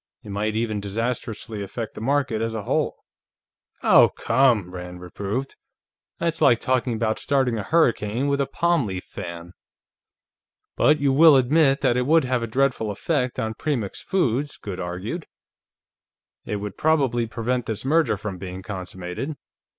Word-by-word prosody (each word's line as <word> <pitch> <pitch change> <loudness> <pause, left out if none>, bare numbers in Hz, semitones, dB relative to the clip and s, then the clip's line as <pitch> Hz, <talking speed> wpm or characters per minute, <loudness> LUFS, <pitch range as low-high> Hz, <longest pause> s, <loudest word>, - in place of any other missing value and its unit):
It - - -10
might 105 +2 -1
even 110 -2 -1
disastrously 110 +1 -3
affect 110 +3 -5
the - - -8
market 130 -3 0
as 115 0 -2
a 110 - -3
whole." - - 0 0.9
"Oh, - - +7
come!" 115 -7 +2
Rand 90 0 -7
reproved. 100 +8 -4 0.6
"That's 165 -1 -2
like 120 - +6
talking 130 -1 0
about 110 -1 -1
starting 130 -5 +1
a - - -3
hurricane 120 - +1
with 140 0 +1
a 135 - 0
palm 170 -3 +1
leaf 95 -1 -4
fan." 85 -2 -8 1.2
"But 150 0 +4
you 140 -1 +2
will 155 +1 +8
admit 135 +2 +3
that 120 - +2
it 125 +1 0
would 160 +1 +5
have 125 -1 0
a 115 - -2
dreadful 125 -2 +1
effect 125 +4 -1
on 110 0 -2
Premix 120 -6 -3
Foods," 145 -6 0
Goode 95 -3 -6
argued. 95 - -5 1.2
"It 105 - -3
would 100 -1 -5
probably 135 -7 +2
prevent 120 +1 -2
this 110 +1 -4
merger 155 -5 +2
from 100 -2 -6
being 95 0 -7
consummated. 95 - -5
115 Hz, 155 wpm, -24 LUFS, 100-135 Hz, 1.2 s, will